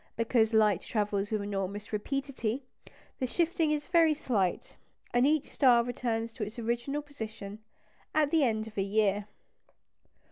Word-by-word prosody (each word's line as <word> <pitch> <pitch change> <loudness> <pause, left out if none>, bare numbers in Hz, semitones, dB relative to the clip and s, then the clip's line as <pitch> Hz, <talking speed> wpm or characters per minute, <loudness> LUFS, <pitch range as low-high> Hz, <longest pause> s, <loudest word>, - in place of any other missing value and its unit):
Because 230 -1 +2
light 210 -4 +4
travels 205 -2 -1
with 215 -2 -1
enormous 200 +1 -4
rapidity, 265 +1 -2 0.6
the 255 - 0
shifting 330 +2 +1
is 300 -1 0
very 330 -3 +4
slight; 205 -11 -1 0.4
and 245 +2 +4
each 305 -1 +2
star 245 -4 +4
returns 230 -2 -2
to 225 - -4
its 210 +4 -6
original 240 +5 -2
position 220 -7 -8 0.6
at 305 -2 +3
the 320 -3 +4
end 220 -4 +1
of 215 -2 -6
a - - +3
year. 205 0 +1
230 Hz, 145 wpm, -30 LUFS, 210-275 Hz, 0.6 s, light